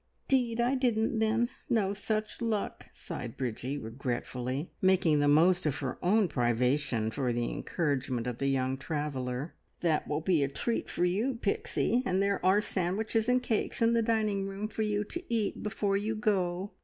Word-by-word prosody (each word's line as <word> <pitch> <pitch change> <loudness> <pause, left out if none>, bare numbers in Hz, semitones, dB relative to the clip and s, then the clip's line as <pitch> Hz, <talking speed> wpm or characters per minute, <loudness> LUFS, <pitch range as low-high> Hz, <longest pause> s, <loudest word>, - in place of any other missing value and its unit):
"'Deed 245 -3 +2
I 240 +2 +3
didn't, 230 -4 +1
then. 220 +2 +2 0.2
No 200 -4 +2
such 215 +2 -2
luck!" 220 -3 -2
sighed 120 -2 -7
Bridgie 130 +2 -3
regretfully, 125 +3 -3
making 185 -5 +4
the 145 - +3
most 170 +4 +4
of 145 - 0
her 130 -3 -4
own 200 +3 +4
privation 125 -2 +1
for 130 0 -1
the 120 0 -1
encouragement 135 -7 -1
of 125 -2 -4
the 140 - 0
young 130 -1 +1
traveller. 140 -1 -3 0.3
"That 160 -3 +1
will 150 +1 -1
be 170 -2 +2
a - - +1
treat 230 - -2
for 175 - +1
you, 215 +9 0
Pixie, 435 - 0
and 190 -6 0
there 200 0 +1
are 190 +3 +4
sandwiches 215 +5 0
and 250 0 +3
cakes 225 -3 -1
in 230 0 +4
the 230 - +3
dining 215 -3 +1
room 195 +2 -4
for 220 - -4
you 210 -1 +1
to 345 +11 -4
eat 220 -3 0
before 205 -2 0
you 215 +2 -2
go. 195 -3 0
185 Hz, 175 wpm, -30 LUFS, 140-220 Hz, 0.3 s, making